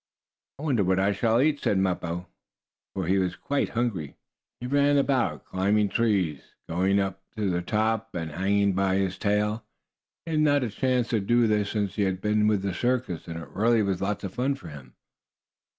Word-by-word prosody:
"I 140 Hz, -, -9 dB
wonder 130 Hz, -9 st, +2 dB
what 95 Hz, +1 st, +2 dB
I 100 Hz, +1 st, +2 dB
shall 110 Hz, +3 st, +2 dB
eat," 145 Hz, +2 st, +2 dB
said 100 Hz, -, +1 dB
Mappo, 90 Hz, -2 st, -1 dB, 0.7 s
for 95 Hz, -2 st, -2 dB
he 95 Hz, +3 st, +2 dB
was 90 Hz, -1 st, -1 dB
quite 145 Hz, 0 st, -1 dB
hungry. 95 Hz, -, -1 dB, 0.4 s
He 125 Hz, -, -6 dB
ran 145 Hz, +2 st, +3 dB
about, 135 Hz, -3 st, 0 dB
climbing 100 Hz, +2 st, +1 dB
trees, 95 Hz, -11 st, 0 dB
going 95 Hz, +4 st, +1 dB
away 100 Hz, -, +3 dB
up 95 Hz, 0 st, -10 dB, 0.2 s
to 100 Hz, -3 st, 0 dB
the 90 Hz, 0 st, 0 dB
top, 110 Hz, +3 st, -1 dB
and 80 Hz, -2 st, -3 dB
hanging 100 Hz, +5 st, +1 dB
down 95 Hz, -, -1 dB
by 95 Hz, 0 st, +1 dB
his 95 Hz, -1 st, -1 dB
tail. 105 Hz, +2 st, 0 dB, 0.6 s
He 165 Hz, -, -5 dB
had 155 Hz, -, +1 dB
not 145 Hz, -2 st, +3 dB
had 115 Hz, -, -2 dB
a -, -, -17 dB
chance 125 Hz, -2 st, +1 dB
to 115 Hz, -, +1 dB
do 120 Hz, +4 st, +3 dB
this 105 Hz, -2 st, +1 dB
since 105 Hz, -2 st, -2 dB
he -, -, +1 dB
had 95 Hz, -2 st, 0 dB
been 105 Hz, +1 st, +2 dB
with 105 Hz, -3 st, +1 dB
the 100 Hz, -2 st, -1 dB
circus, 120 Hz, -5 st, -1 dB
and, 85 Hz, 0 st, -6 dB
really, 115 Hz, +2 st, +3 dB
it -, -, +2 dB
was 95 Hz, -2 st, -1 dB
lots 100 Hz, +1 st, -2 dB
of 95 Hz, -2 st, -5 dB
fun 130 Hz, +3 st, 0 dB
for 135 Hz, -, -11 dB
him. 65 Hz, -5 st, -12 dB
100 Hz, 210 wpm, -26 LUFS, 95-120 Hz, 0.7 s, ran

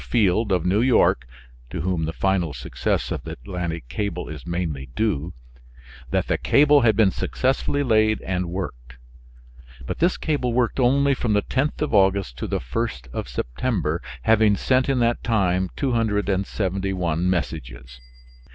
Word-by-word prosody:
Field 105 Hz, -1 st, +1 dB
of 90 Hz, -2 st, +1 dB
New 95 Hz, +4 st, +2 dB
York 120 Hz, -, +3 dB, 0.4 s
(to 80 Hz, -, -4 dB
whom 85 Hz, -2 st, -1 dB
the 80 Hz, -, -2 dB
final 90 Hz, -4 st, 0 dB
success -, -, -2 dB
of -, -, -2 dB
the -, -, -7 dB
Atlantic 85 Hz, +3 st, -5 dB
cable 90 Hz, +6 st, -3 dB
is 75 Hz, 0 st, -8 dB
mainly 85 Hz, -6 st, -3 dB
due), 95 Hz, -7 st, 0 dB, 0.8 s
that -, -, 0 dB
the -, -, -1 dB
cable 145 Hz, 0 st, +5 dB
had 110 Hz, -4 st, +4 dB
been 105 Hz, -3 st, +4 dB
successfully 135 Hz, +5 st, 0 dB
laid 110 Hz, -3 st, +3 dB
and 90 Hz, -2 st, -2 dB
worked. 60 Hz, -10 st, -6 dB, 0.9 s
But -, -, -4 dB
this 175 Hz, +3 st, +2 dB
cable 140 Hz, -6 st, -1 dB
worked 120 Hz, +2 st, +1 dB
only 140 Hz, +3 st, +3 dB
from 120 Hz, -4 st, -1 dB
the 105 Hz, -1 st, +2 dB
10th 145 Hz, +3 st, -1 dB
of 150 Hz, -, -3 dB
August 95 Hz, -, +3 dB
to -, -, -3 dB
the -, -, -1 dB
1st 65 Hz, -, -4 dB
of -, -, -4 dB
September, 80 Hz, -, -2 dB, 0.2 s
having 110 Hz, +1 st, +4 dB
sent 130 Hz, +4 st, +2 dB
in 135 Hz, -, +2 dB
that 120 Hz, 0 st, +1 dB
time 95 Hz, -5 st, +1 dB
271 95 Hz, -, 0 dB
messages. 60 Hz, -8 st, -4 dB
95 Hz, 150 wpm, -23 LUFS, 85-115 Hz, 0.9 s, cable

